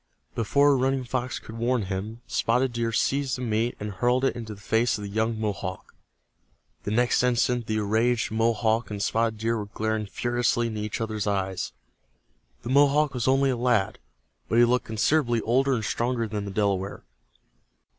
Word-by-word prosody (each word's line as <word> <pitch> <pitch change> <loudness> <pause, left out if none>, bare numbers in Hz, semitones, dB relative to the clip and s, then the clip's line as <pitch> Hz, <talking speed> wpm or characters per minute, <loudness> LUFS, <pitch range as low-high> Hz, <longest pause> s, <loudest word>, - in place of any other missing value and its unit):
Before 140 +5 +3
Running 135 0 +1
Fox 125 +1 -3
could 115 +1 -9
warn 120 -1 +1
him, 100 +5 -5
Spotted 125 +2 +1
Deer 115 -1 -1
seized 135 +3 0
the 125 - -5
meat 115 +1 0
and 105 0 -4
hurled 125 +7 +1
it - - +1
into 110 -3 -6
the - - -16
face 115 +3 +1
of 105 - -7
the 100 - -5
young 110 +1 0
Mohawk. 100 -3 -4 0.9
The - - -1
next 120 +3 +2
instant 125 -1 +1
the 110 - 0
enraged 110 +3 +1
Mohawk 115 +1 +1
and 105 -1 -5
Spotted 110 +2 0
Deer 115 +1 -1
were 105 - -5
glaring 110 0 -2
furiously 120 +2 0
into 110 -2 -3
each 105 +1 -4
other's 110 -2 -2
eyes. 95 -2 -1 0.9
The - - -5
Mohawk 145 +2 +4
was 125 -2 -2
only 135 +1 +3
a - - 0
lad, 120 -5 +1 0.5
but 115 - +1
he 120 - +7
looked 125 +1 +1
considerably 120 +2 +1
older 130 +4 +2
and 110 -3 -2
stronger 115 +2 -1
than 105 -1 -4
the 100 - -5
Delaware. 100 -1 -1
115 Hz, 175 wpm, -26 LUFS, 105-125 Hz, 0.9 s, he